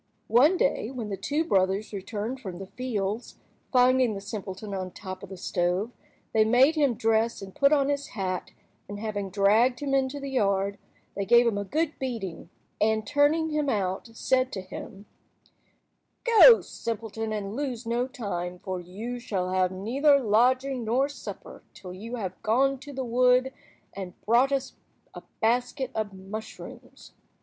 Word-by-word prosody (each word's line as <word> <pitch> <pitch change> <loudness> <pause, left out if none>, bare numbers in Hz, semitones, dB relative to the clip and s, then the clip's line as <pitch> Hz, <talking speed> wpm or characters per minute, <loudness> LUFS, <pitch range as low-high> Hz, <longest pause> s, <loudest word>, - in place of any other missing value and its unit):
One 290 +11 +5
day - - +1
when 245 -5 -5
the 200 - -2
two 290 - -1
brothers 195 - +1
returned 210 +5 -4
from 190 -8 -7
the 195 - -7
fields, 215 -1 -4 0.3
finding 250 -3 +4
the - - -4
simpleton 200 0 -6
on 190 -1 -2
the 185 - -13
top 185 -2 -7
of 200 - -10
the 190 - -8
stove, 180 +5 -1 0.4
they 220 - +5
made 250 +7 +5
him 285 -6 +2
dress 225 +1 +1
and 195 -1 -9
put 280 0 +3
on 280 -2 +3
his 285 0 -1
hat, 185 -3 -3 0.4
and 205 0 -6
having 205 -2 -3
dragged 215 +6 +3
him 280 -2 -2
into 270 +1 +1
the 275 -1 -6
yard, 200 -4 +1 0.4
they 200 - -1
gave 235 +4 +5
him 220 -4 +1
a - - -2
good 310 +9 -2
beating, 210 - -5 0.3
and 220 0 +2
turning 295 +2 +2
him 300 -2 0
out, 195 -2 -1
said 255 +3 +1
to 190 - -3
him— 195 +2 -9 1.2
"Go, 465 0 +8
simpleton, 225 -1 -5
and 205 -1 -4
lose 255 -4 -3
no 240 +2 0
time, 190 -9 -4
for 185 0 -5
you 210 +8 -6
shall 185 -6 -2
have 185 -1 +2
neither 270 +10 +3
lodging 255 +3 +2
nor 255 +6 +1
supper 285 - -9
until 180 -2 -9
you 225 +6 -6
have 190 -6 -5
gone 265 +5 +2
to 285 +2 -10
the 265 -1 -4
wood 250 +2 +3 0.4
and 190 -2 -8
brought 245 +5 +4
us 275 -1 -1 0.4
a - - -9 0.2
basket 245 +3 0
of 215 -2 -2
mushrooms." 195 +3 -10
225 Hz, 165 wpm, -27 LUFS, 195-260 Hz, 1.2 s, Go